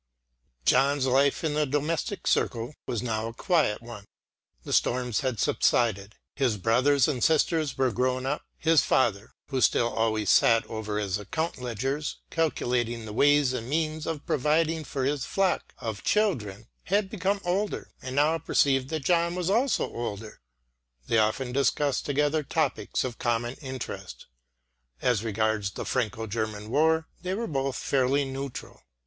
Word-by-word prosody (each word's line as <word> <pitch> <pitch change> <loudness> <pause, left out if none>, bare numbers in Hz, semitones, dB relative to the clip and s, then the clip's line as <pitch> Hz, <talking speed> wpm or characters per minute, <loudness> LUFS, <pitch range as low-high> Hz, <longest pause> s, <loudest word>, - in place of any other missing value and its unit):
John's 135 +1 +3
life 135 +3 +2
in 155 -2 0
the 150 0 +1
domestic 155 - -2
circle 120 +3 0
was 120 -1 -2
now 110 -2 -2
a 115 - -8
quiet 150 - +1
one. 115 -4 -9 0.6
The - - -4
storms 125 -2 +1
had 130 -6 -2
subsided; 105 -3 +1 0.2
his 125 -6 0
brothers 130 +7 +3
and 130 -6 -1
sisters 160 -2 +2
were 130 -2 +2
grown 130 +3 0
up. 140 +3 -1 0.2
His 160 -2 +4
father, 110 -4 +1 0.2
who 135 -2 -1
still 120 0 +3
always 110 -2 +1
sat 115 -1 +5
over 110 -2 -4
his 100 -2 -1
account 160 - -3
ledgers, 135 +5 -3
calculating 120 -7 -1
the 105 - -7
ways 145 +1 +4
and 120 -1 -4
means 155 +1 -1
of 160 -3 -4
providing 155 +3 +1
for 135 -2 -2
his 140 0 0
flock 195 -2 0
of 110 -2 -5
children, 115 - 0 0.2
had 200 +2 +1
become 195 0 -1
older, 195 +4 -2
and 130 0 -6
now 155 +3 +3
perceived 135 -4 +2
that 155 -4 -3
John 170 +1 +2
was 180 +1 -1
also 245 +5 +2
older. 110 -2 -6 0.6
They 115 - +2
often 110 +4 0
discussed 140 +1 +1
together 145 +2 +1
topics 140 -8 -1
of 125 -2 -5
common 120 0 0
interest. 130 -3 -7 0.7
As 115 - +1
regards 110 -2 0
the - - -6
Franco 115 -3 -1
German 110 0 -4
War 160 +3 +3
they 185 +1 -2
were 230 +3 -2
both 135 - -2
fairly 140 +1 +1
neutral. 135 0 -7
130 Hz, 155 wpm, -27 LUFS, 115-155 Hz, 0.7 s, sat